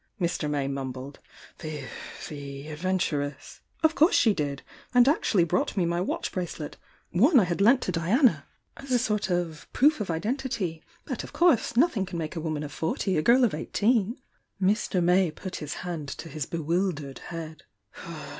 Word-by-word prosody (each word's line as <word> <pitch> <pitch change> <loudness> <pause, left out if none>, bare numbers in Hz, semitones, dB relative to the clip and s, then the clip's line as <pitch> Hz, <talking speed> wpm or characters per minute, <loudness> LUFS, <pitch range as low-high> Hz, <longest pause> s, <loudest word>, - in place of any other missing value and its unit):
Mr. 170 -4 -1
May 145 -2 0
mumbled. 135 0 -5 0.4
"The— 155 -3 -5 0.4
the 140 0 -7
adventuress 150 -3 -2
?" - - -36
"Of 315 0 +5
course 320 +3 +4
she 235 -10 +5
did!— 145 -5 -3 0.3
and 245 0 +7
actually 225 - +3
brought 175 +5 0
me 180 - +3
my 170 +1 0
watch 185 - -2
bracelet— 170 -4 -4 0.4
one 255 - +5
I - - +4
had 180 +1 -1
lent 245 +5 +6
to - - -1
Diana— 180 - +2 0.3
as 275 - -10
a 250 - +4
sort 215 -4 0
of 170 -5 -2
proof 295 -2 +4
of 200 - -3
identity. 200 - -2 0.2
But - - -4
of - - -10
course 295 -9 +3
nothing 245 - +3
can 180 - -5
make 160 +1 -4
a 165 - -3
woman 155 -2 -2
of 150 - -6
forty 185 +4 -1
a 155 - +2
girl 245 +8 +5
of 235 - +3
eighteen!" 215 - +1 0.4
Mr. 190 -2 +1
May 180 +1 +4
put 185 +4 -7
his 150 -2 -5
hand 165 -5 -4
to 165 - -7
his 155 -3 -4
bewildered 165 -3 -2
head. 160 -2 -7
175 Hz, 175 wpm, -27 LUFS, 155-220 Hz, 0.4 s, and